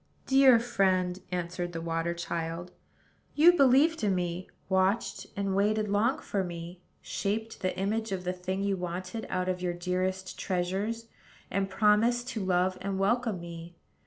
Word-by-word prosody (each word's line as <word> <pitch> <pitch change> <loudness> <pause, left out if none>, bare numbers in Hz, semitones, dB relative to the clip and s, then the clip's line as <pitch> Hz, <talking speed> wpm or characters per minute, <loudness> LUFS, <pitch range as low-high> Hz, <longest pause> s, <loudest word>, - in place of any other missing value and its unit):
"Dear 265 -3 +6
friend," 190 -6 +1
answered 175 0 -3
the 165 - -3
water 165 +1 -2
child, 170 +1 -4 0.6
"you 330 +4 +7
believed 280 0 +4
in 200 -2 +2
me, 180 0 -3 0.2
watched 190 +4 +1
and 195 -1 -1
waited 210 +1 +1
long 215 +6 +2
for 195 -2 -2
me, 175 0 -7 0.2
shaped 220 +2 -3
the 185 -1 -1
image 220 +3 -1
of 185 -1 -2
the 180 0 -1
thing 185 +2 -3
you 200 -1 +1
wanted 185 +4 -5
out 185 0 -1
of 180 -1 -1
your 180 -1 -1
dearest 185 +1 -2
treasures, 195 +5 -2 0.5
and 195 0 0
promised 225 +4 +3
to 220 -5 -3
love 185 0 +1
and 195 -1 -2
welcome 220 0 +1
me. 170 0 -9
190 Hz, 155 wpm, -29 LUFS, 180-215 Hz, 0.6 s, you